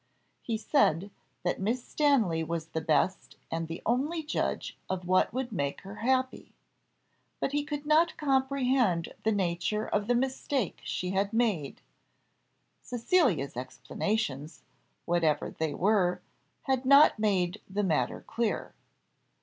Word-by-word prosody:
He 225 -2 -2
said, 205 - +2 0.3
that 180 +1 -1
Miss 235 +5 -1
Stanley 230 - +2
was 165 0 -4
the 160 - -3
best 170 +4 0 0.2
and 165 0 -2
the 165 +1 -7
only 290 +8 0
judge 300 - -2
of 185 -1 -3
what 185 0 +3
would 255 0 -3
make 140 -8 -2
her 195 +2 -10
happy; 260 +2 -1 0.8
but - - -1
he 290 0 0
could 295 -1 -5
not 320 +2 +3
comprehend 265 - +1
the 220 - +1
nature 195 +2 0
of 205 0 -1
the 245 - +3
mistake 260 - -1
she 180 0 -3
had 195 +2 0
made; 210 - 0 1.0
Cecilia's 235 - +1
explanations, 150 - -3 0.4
whatever 165 -4 +1
they 160 -2 -3
were, 190 -2 +2 0.4
had 265 -2 0
not 280 -2 +6
made 185 -5 +1
the 205 +2 -1
matter 150 -10 0
clear. 230 -2 -2
210 Hz, 130 wpm, -29 LUFS, 170-260 Hz, 1.0 s, not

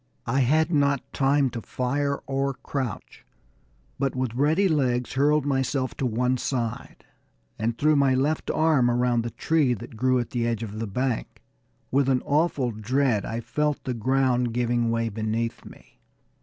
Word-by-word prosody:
I 130 +3 +1
had 155 +6 +2
not 140 -2 +1
time 135 -1 +2
to 115 - -5
fire 140 +5 -2
or 135 0 -1
crouch, 130 -7 -5 0.8
but 135 -1 0
with 130 -3 -2
ready 155 +10 +2
legs 125 -7 0
hurled 145 +2 +2
myself 135 -1 0
to 130 - 0
one 125 +2 0
side, 120 -4 -4 0.5
and 115 +1 -1
threw 155 +1 +3
my 140 -2 +3
left 145 +4 0
arm 155 -6 +3
around 120 0 +2
the 115 - -4
tree 145 -2 +1
that 115 +3 -10
grew 130 +2 +2
at 120 - -2
the 120 -3 -1
edge 115 -1 -2
of 110 -1 -6
the 115 - -3
bank. 125 +3 -3 0.5
With 135 0 +2
an 130 -1 +1
awful 145 -4 +1
dread 115 +1 0
I 115 +2 -3
felt 150 +4 -1
the 130 - -2
ground 125 0 +1
giving 120 -1 +1
way 115 0 0
beneath 110 +2 -3
me. - - -16
130 Hz, 165 wpm, -25 LUFS, 120-140 Hz, 0.8 s, threw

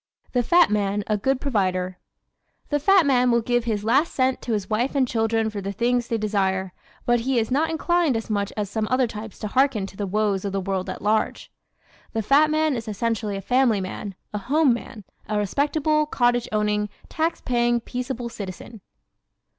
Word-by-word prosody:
The 250 - +2
Fat 345 +3 +4
Man 205 0 0
a 215 - 0
Good 265 +6 0
Provider 185 -8 -1 0.7
¶ - - -36
The 290 - +1
fat 375 +3 +5
man 250 -3 +3
will 235 0 +3
give 240 0 0
his 215 -3 -1
last 270 +9 +2
cent 260 -1 +1
to 235 - -2
his 205 -3 -2
wife 240 +6 -1
and 265 -2 +3
children 225 -1 0
for 205 -1 -5
the 195 +1 -3
things 240 +3 0
they 230 - 0
desire 190 -3 -1 0.3
but 240 0 +3
he 255 +2 0
is 225 +1 0
not 310 +5 +2
inclined 325 -4 +1
as 225 - -5
much 205 -2 -1
as 210 -1 -1
some 215 +2 -2
other 255 0 +3
types 220 -2 -8
to 215 - -4
hearken 255 -3 +2
to 195 - -11
the 200 0 -3
woes 205 -1 0
of 200 -1 -3
the 195 - 0
world 190 -1 -2
at - - -6
large. 215 +1 0 0.6
The 225 - -1
fat 285 +7 +4
man 310 -2 +1
is 230 -1 -5
essentially 215 -1 -2
a - - -5
family 245 0 +2
man, 190 +1 -5 0.2
a 210 - -2
home 280 +5 +3
man, 230 -2 -7 0.3
a 210 - 0
respectable, 295 - +1
cottage 245 -4 +1
owning, 210 -1 0 0.2
tax 325 +1 -1
paying, 240 -1 +1
peaceable 245 0 -4
citizen. 205 0 -8
230 Hz, 200 wpm, -24 LUFS, 205-260 Hz, 0.7 s, fat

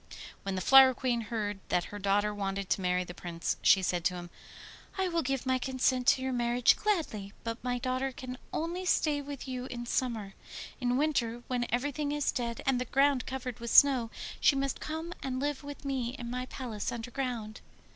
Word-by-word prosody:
When 195 -1 -3
the 185 - -2
Flower 265 +4 +8
Queen 245 -2 0
heard 210 -2 -3
that 175 - +2
her 205 - -5
daughter 205 +1 +2
wanted 195 -1 -3
to - - +2
marry 180 0 +1
the 175 - -8
Prince, 170 -1 -3
she 190 - +5
said 175 -1 0
to 180 - +2
him: 175 -1 -8 0.7
'I 380 -1 +1
will 335 -1 +1
give 270 -1 -2
my 260 0 +2
consent 255 -1 0
to 260 - +4
your 260 0 -1
marriage 240 0 +3
gladly, 295 - -1
but 230 0 -4
my 250 0 0
daughter 255 +2 -1
can 255 0 -7
only 340 +3 -2
stay 305 -5 +2
with 280 -1 -7
you 255 -1 -4
in 240 -1 -6
summer. 230 -5 -1 0.5
In 250 -1 +1
winter, 240 -6 0
when 245 -1 -1
everything 285 +4 -1
is 295 -1 +1
dead 235 -2 -3
and 260 -2 +2
the - - -1
ground 275 +1 +2
covered 255 -2 -5
with 235 0 -5
snow, 260 -3 +6 0.3
she 280 - +5
must 275 0 -1
come 320 +2 -4
and 255 -1 -2
live 290 0 -2
with 285 0 -9
me 260 -2 -2
in 240 -2 -6
my 250 +1 -3
palace 230 -7 -4
underground. 235 -2 -4
250 Hz, 195 wpm, -31 LUFS, 225-270 Hz, 0.7 s, Flower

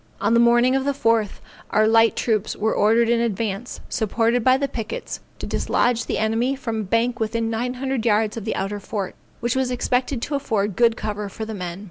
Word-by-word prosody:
On - - +1
the 235 - +5
morning 240 +2 +4
of 270 - +1
the 280 +1 0
4th, 225 -5 +1 0.3
our 215 0 +3
light 225 0 +4
troops 215 -3 0
were 220 +1 0
ordered 225 +2 +3
in 235 0 +2
advance, 225 0 -3
supported 230 +1 0
by 255 +1 +5
the 280 +1 -1
pickets, 250 - -5 0.2
to - - -6
dislodge 240 -1 0
the - - -1
enemy 225 +5 +1
from 230 -4 -4
a - - -2
bank 230 +5 0
within 225 +1 -1
nine 245 +3 -2
hundred 265 -2 -2
yards 215 -1 +2
of 225 - -5
the 220 - -2
outer 200 +2 -3
fort, 200 -1 -4 0.3
which 240 +1 0
was 260 -1 +1
expected 250 +1 0
to 300 - -4
afford 215 -8 -1
good 230 -1 +3
cover 210 -1 -4
for 220 +2 -6
the 220 - -6
men. 180 -3 -5
230 Hz, 210 wpm, -22 LUFS, 215-245 Hz, 0.3 s, the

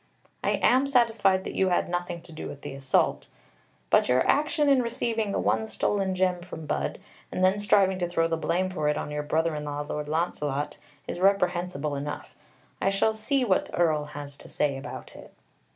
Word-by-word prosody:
I - - +2
am 260 +3 +4
satisfied 225 -8 +3
that - - -5
you 190 - +2
had 175 - +1
nothing 175 -1 -3
to 175 - -13
do 155 - -6
with 140 - -9
the - - -6
assault, 135 -1 +1 0.6
but - - +4
your 125 +1 +3
action 295 +1 +2
in 275 -2 +5
receiving 230 -3 -1
the - - -1
one 220 - +1
stolen 195 -3 0
gem 185 -1 +1
from 170 -3 -8
Budd, - - -2 0.3
and 185 - +2
then 190 +2 +3
striving 195 -2 +3
to 175 -1 -1
throw 165 -1 +2
the 165 - 0
blame 175 +3 0
for 155 -5 0
it 150 - 0
on - - -4
your 150 0 -2
brother 160 +2 0
in 150 0 -4
law, 145 0 -3
Lord 150 0 -4
Launcelot, 150 -3 -2 0.3
is - - -5
reprehensible 180 -6 +1
enough. 145 +1 -5 0.5
I - - +3
shall 195 +3 +2
see 250 +5 0
what 190 -5 +2
the - - -7
Earl 155 -4 +2
has 145 -1 -9
to - - -13
say 145 -2 0
about 135 - -8
it." - - -12
175 Hz, 200 wpm, -27 LUFS, 150-200 Hz, 0.6 s, in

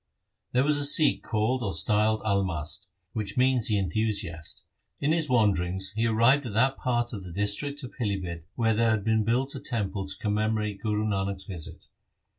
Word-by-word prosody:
There 125 +1 +3
was 145 0 +3
a - - +2
Sikh 145 +1 +5
called 115 +4 0
or 100 -5 -2
styled 110 0 +3
Almast, 95 -7 -1 0.3
which 105 -1 -4
means 130 -2 +3
the 105 - +2
enthusiast. 95 -4 -1 0.3
In 145 - +1
his 160 -2 +1
wanderings 95 -5 +1
he 115 +1 +1
arrived 120 +5 +3
at 105 - -6
that 130 +5 +3
part 120 -1 -1
of 100 -3 -6
the 90 - -9
district 105 - -1
of 125 - -7
Pilibhit 95 -8 -3
where 110 -2 +2
there 115 +1 +2
had 110 -2 +1
been 110 0 +2
built 125 +5 0
a 135 - -5
temple 100 -5 -3
to 95 0 -5
commemorate 105 -1 -1
Guru 105 0 -1
Nanak's 100 -2 -2
visit. 90 -6 -7
110 Hz, 180 wpm, -27 LUFS, 100-120 Hz, 0.3 s, Sikh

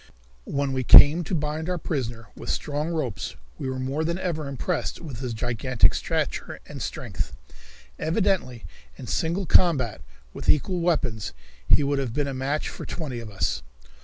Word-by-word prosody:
When 140 -1 -1
we 130 -1 0
came 150 +7 +9
to 180 - -1
bind 155 +2 -2
our 180 - 0
prisoner 120 - -3
with - - -7
strong 150 +2 -1
ropes 155 -10 -3 0.2
we 130 - -2
were 130 - -3
more 135 +4 -1
than 170 +2 -1
ever 165 -5 -2
impressed 140 +6 -2
with 140 -9 -7
his 125 -2 -3
gigantic 120 +2 +2
stature - - -2
and - - -8
strength. 65 0 -4 0.6
Evidently 165 - 0 0.3
in - - -8
single 170 +4 -1
combat 135 - +4 0.3
with - - -4
equal 175 +5 +3
weapons 155 - 0 0.3
he 150 - +5
would 140 0 +1
have 125 -4 -3
been 145 -1 0
a 140 - -3
match 135 +3 -1
for - - -7
twenty 140 -8 -4
of 115 -2 -7
us. 95 -9 -1
140 Hz, 165 wpm, -25 LUFS, 125-160 Hz, 0.6 s, came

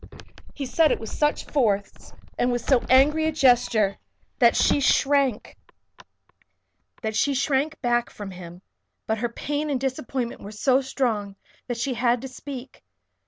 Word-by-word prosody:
He 280 - -4
said 310 +4 +3
it - - 0
with 225 - -7
such 295 0 0
force, 210 -8 -1 0.2
and 245 - +1
with 240 -1 -2
so 260 -4 +3
angry 295 +5 +4
a 315 - +1
gesture, 245 -8 +2 0.4
that 235 -3 +5
she - - +3
shrank 275 -3 +2 2.3
back 240 0 +1
from 205 -2 -8
him. 175 0 -11 0.4
But 220 0 -1
her 240 +1 -1
pain 295 +5 -3
and 275 -3 0
disappointment 260 -2 -3
were 205 - -8
so 255 +5 +2
strong 225 -7 -2 0.3
that 245 -2 -3
she 255 +3 -1
had 240 0 +1
to - - -4
speak. 260 0 -9
250 Hz, 140 wpm, -24 LUFS, 225-275 Hz, 2.3 s, that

